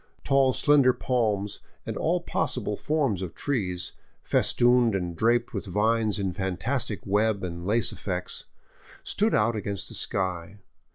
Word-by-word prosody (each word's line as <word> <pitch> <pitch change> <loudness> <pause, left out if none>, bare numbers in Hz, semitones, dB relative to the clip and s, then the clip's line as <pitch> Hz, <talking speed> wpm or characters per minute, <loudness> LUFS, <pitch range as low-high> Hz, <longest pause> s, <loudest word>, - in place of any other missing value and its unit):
Tall, 135 -1 +4
slender 140 -1 +4
palms, 105 -7 -1 0.3
and - - -4
all - - 0
possible - - -2
forms 140 - 0
of 90 -3 -5
trees, 95 -11 -2 0.3
festooned 120 -3 +3
and 90 -3 -2
draped 115 +6 +2
with 100 -2 -4
vines 110 +2 +1
in 95 -3 -1
fantastic 100 +5 -2
web 105 0 +1
and 85 0 -5
lace 115 +2 +2
effects, 90 -2 -4 0.6
stood 215 +2 +1
out 115 +2 +2
against 100 -3 -3
the - - -8
sky. 95 0 -2
105 Hz, 135 wpm, -27 LUFS, 95-120 Hz, 0.6 s, Tall